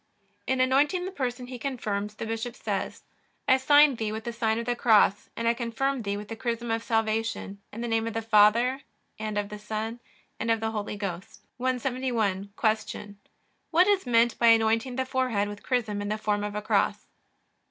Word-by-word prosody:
In 260 0 +1
anointing 285 +8 +3
the 380 - -4
person 250 -6 -3
he 250 0 -8
confirms 210 -6 -3
the 225 - -5
bishop 225 +2 -4
says: - - -4 0.4
I 260 - +6
sign 290 0 +5
thee 220 -2 -2
with 220 +1 -5
the 235 - -4
sign 220 -1 0
of 235 - -3
the 245 0 0
cross, 215 -4 +3
and 230 - -1
I 230 - +4
confirm 245 +3 -1
thee 200 -1 -2
with 210 0 -7
the 225 - -6
chrism 235 0 -3
of 225 0 0
salvation, 225 -3 -1
in 225 - -7
the 240 - -2
name 225 0 0
of 230 - -5
the 225 - -1
Father, 225 +5 +4 0.4
and 215 -1 -3
of 205 -1 -1
the 210 0 -7
Son, 220 +2 -4 0.4
and 225 - -2
of 225 -1 +3
the 220 0 -2
Holy 210 -1 -4
Ghost. 190 -3 -6
171. 245 -6 -1
Q. 215 -2 -1 0.5
What 345 +2 +5
is 395 -7 +2
meant 235 -1 +3
by 235 - +4
anointing 225 +2 +3
the 260 0 -1
forehead 255 -6 0
with 205 0 -8
chrism 220 -5 -1
in 205 - -3
the 215 - -1
form 210 -1 -1
of 210 0 -4
a 210 - -3
cross? - - +1
225 Hz, 200 wpm, -27 LUFS, 210-250 Hz, 0.5 s, I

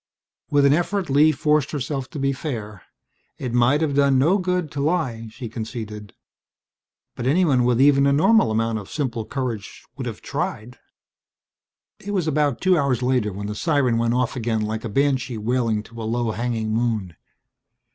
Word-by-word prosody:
With 145 -1 +3
an 140 - +5
effort 175 +1 -1
Lee 150 +3 +5
forced 150 -1 +1
herself 135 -2 -3
to - - -8
be 135 0 0
fair. 110 - -6 0.6
It 125 -3 -4
might 125 +5 +3
have 155 -3 0
done 140 -1 +3
no 165 +10 +3
good 180 -4 -1
to 145 - -5
lie, 140 -8 -1
she 115 +2 -8
conceded. 110 -3 -7 1.0
But 125 - -3
anyone 140 -5 +3
with 125 -1 +2
even 140 0 +5
a - - +4
normal 160 - +4
amount 110 0 0
of 100 - -11
simple 120 -7 -3
courage 120 -7 -5
would - - -4
have - - -6
tried. 120 +4 -4 1.2
It 205 +1 -5
was 175 -4 0
about 145 -4 +1
two 185 -1 +4
hours 130 -3 0
later 125 -4 +1
when 100 +2 -6
the 105 - -3
siren 130 -2 +1
went 115 +1 +1
off 125 0 0
again 115 -3 -1
like 110 +1 -3
a 115 - -4
banshee 130 0 0
wailing 115 -1 0
to 115 +1 -10
a - - -4
low 120 -1 0
hanging 110 -1 -2
moon. 110 -7 -1
125 Hz, 175 wpm, -22 LUFS, 115-145 Hz, 1.2 s, an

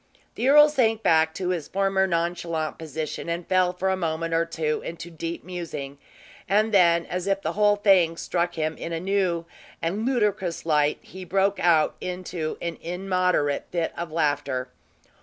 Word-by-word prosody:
The 255 - 0
earl 295 +1 +8
sank 225 -7 +1
back 160 0 +4
to 185 -2 -2
his 170 -5 -2
former 195 0 +1
nonchalant 170 -2 -2
position 160 +1 -5
and 170 0 -3
fell 185 -1 +2
for 185 +1 -2
a - - +2
moment 165 -2 -2
or 165 +1 +2
two 155 -2 -2
into 170 +1 -7
deep 165 +1 -5
musing; 165 -6 -6 0.5
and 215 +2 +2
then, 170 -3 +5
as 180 +1 -4
if 195 0 0
the - - -1
whole 210 0 +3
thing 190 -5 +3
struck 175 0 -1
him 155 0 -1
in 170 - -5
a 165 - -2
new 185 -2 0 0.3
and 190 +7 -2
ludicrous 210 -10 0
light, 150 -2 +2
he 185 0 -10
broke 195 +2 +1
out 165 -3 +3
into 180 -3 -4
an 170 -1 -4
immoderate 180 -4 0
fit 170 -2 -1
of 170 -1 -5
laughter. 145 -5 -1
175 Hz, 170 wpm, -25 LUFS, 165-190 Hz, 0.5 s, earl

